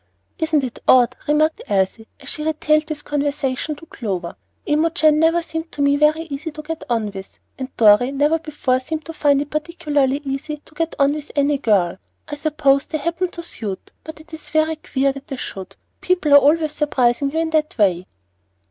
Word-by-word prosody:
"Isn't 315 -3 +1
it 250 -2 -5
odd?" 250 -1 +5
remarked 310 +2 +2
Elsie, 200 +3 0
as 275 - -12
she 300 - -4
retailed 305 0 +1
this 300 -2 -5
conversation 290 0 -2
to 330 - -14
Clover. 200 - -5 0.3
"Imogen 310 0 +3
never 330 +1 +3
seemed 325 0 -6
to 290 - -4
me 280 0 +4
so - - -2
very 320 +1 -6
easy 315 0 -5
to 305 - -8
get 325 +1 -5
on 225 -3 0
with, 195 -1 -10 0.2
and 260 0 -4
Dorry 225 +3 +5
never 295 +4 +2
before 290 -5 -1
seemed 315 +4 -5
to 325 - -7
find 285 -2 +2
it 290 - -17
particularly 300 -3 0
easy 275 +3 -4
to - - -18
get 330 +1 -2
on 280 0 +3
with 300 -1 -7
any 285 0 +2
girl. 190 -7 +1 0.3
I 295 - -8
suppose 290 -2 +1
they 315 - -2
happen 335 +4 -2
to 340 -1 -8
suit, 210 - -7
but 315 0 -9
it 325 +1 -17
is 320 - -8
very 315 0 +1
queer 275 -2 0
that 275 0 -10
they 275 - -4
should. 195 -6 -7 0.3
People 360 -5 +1
are - - +11
always 310 +2 +3
surprising 275 -3 +1
you 320 - -3
in 325 0 0
that 305 -3 0
way." 185 -4 +2
295 Hz, 200 wpm, -20 LUFS, 265-315 Hz, 0.3 s, are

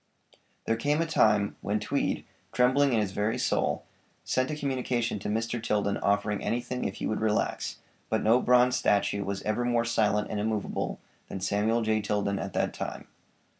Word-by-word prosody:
There 115 - +1
came 145 +6 +1
a 165 - +2
time 105 -10 +2
when 105 +1 0
Tweed, - - -1 0.3
trembling 130 +3 +4
in 115 - +3
his 100 -3 -2
very 105 +3 -1
soul, - - 0 0.4
sent 130 0 0
a 150 - -2
communication 130 -6 -1
to 95 - -4
Mr. 115 +2 -1
Tilden 105 -2 0
offering 100 0 0
anything 120 +1 -2
if 95 - -2
he - - -4
would 110 - -1
relax, 110 -1 0 0.3
but - - 0
no 115 +4 +4
bronze 125 0 +4
statue 100 0 +1
was 100 0 -4
ever 105 +3 0
more 120 -1 +1
silent 105 -2 +1
and 105 - -2
immovable 105 -1 -2 0.3
than 95 - -5
Samuel 105 +5 +1
J. 110 0 +1
Tilden 100 -1 -1
at - - -5
that - - 0
time. - - -6
110 Hz, 175 wpm, -28 LUFS, 105-120 Hz, 0.4 s, trembling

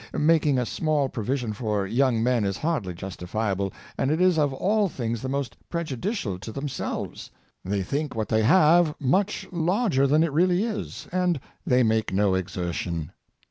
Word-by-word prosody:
Making 150 -3 +3
a 125 - +1
small 150 0 0
pro 115 -4 -4
vision 125 -2 -1
for 105 -2 -1
young 115 +2 +2
men 125 -2 +2
is 100 -1 -1
hardly 145 - -2
justifiable; 95 +2 -3 0.3
and 135 - +1
it 155 +2 +1
is 180 -3 +4
of 145 -2 +2
all 200 +8 +1
things 115 -6 -3
the 130 - -3
most 135 -3 -2
prejudicial 160 - -3
to 110 - -7
themselves. 135 +1 -4 0.3
They 100 +1 -1
think 145 - -3
what 110 -3 -2
thc}^ 110 0 +3
have 160 +4 +5
much 190 +10 +1
larger 175 - +2
than 150 +3 +4
it 165 -4 -1
really 180 +4 +3
is; 225 -2 -4
and 180 -3 +1 0.3
they 125 0 +4
make 110 -1 +1
no 100 0 +2
exertion. 85 -3 -3
130 Hz, 170 wpm, -25 LUFS, 105-165 Hz, 0.3 s, have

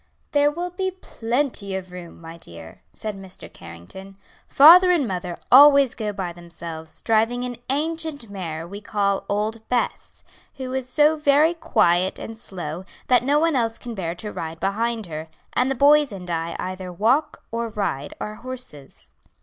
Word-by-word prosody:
"There 290 0 +4
will 350 +4 -4
be 375 +1 -2
plenty 235 - -2
of 185 -1 -6
room, 180 -2 -10
my 165 0 -10
dear," 85 - -11
said 215 -2 -5
Mr. 190 -1 -10
Carrington; 100 - -11 0.3
"father 345 +6 +8
and 330 -8 +3
mother 180 -2 -4
always 280 0 +8
go 215 -2 -3
by 185 -3 -4
themselves, 170 -2 -9
driving 225 +2 +2
an 245 -1 -4
ancient 310 -2 -1
mare 170 -5 -6
we 200 +3 -8
call 200 -1 -1
old 215 +2 -1
Bess, 250 -1 -2 0.3
who 260 -1 -5
is 260 -1 -3
so 300 +4 +4
very 300 +2 +4
quiet 185 - +2
and 225 - -7
slow 180 -6 -7 0.3
that 250 -2 +5
no 280 +4 +2
one 325 0 +2
else 230 -2 0
can 240 -2 -7
bear 175 -5 -4
to 210 +4 -6
ride 160 0 -6
behind 220 +4 -1
her; 160 -1 -6 0.3
and 250 +1 +2
the 270 - 0
boys 290 +1 +5
and 180 -3 -7
I 165 0 -2
either 185 0 -5
walk 230 - +1
or 230 0 -2
ride 195 -10 -3
our 215 0 -5
horses." 250 - -8
215 Hz, 165 wpm, -23 LUFS, 180-270 Hz, 0.3 s, father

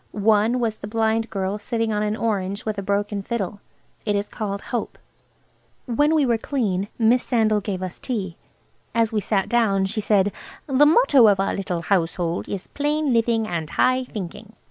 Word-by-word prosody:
One 215 +3 +2
was 225 -3 -1
the 205 - -8
blind 225 +1 0
girl 195 0 -2
sitting 225 0 -1
on 210 - 0
an 210 0 0
orange 200 -3 -2
with 215 -2 -2
a - - -2
broken 200 +1 -1
fiddle. 205 -2 -3 0.4
It 205 -2 0
is 200 +1 -1
called 200 -2 -4
Hope. 240 - -2 0.9
When 290 +6 +2
we 300 -3 +3
were 235 -3 +1
clean 205 -8 -1
Miss 235 +2 +4
Sandal 215 -4 +2
gave 190 -2 -4
us 185 -2 -6
tea. 200 -9 -3 0.6
As 230 -1 +2
we 210 - +1
sat 195 -1 0
down 210 -5 +2
she 215 +3 -2
said, 205 -1 +2 0.3
"The 280 +1 +4
motto 295 - +6
of 200 -2 +4
our 195 - 0
little 180 -3 -3
household 175 -2 -1
is 195 -2 -4
'Plain 295 -1 -1
living 230 -1 +2
and 165 -5 -3
high 255 0 +2
thinking.'" 210 -1 -8
215 Hz, 180 wpm, -23 LUFS, 195-235 Hz, 0.9 s, motto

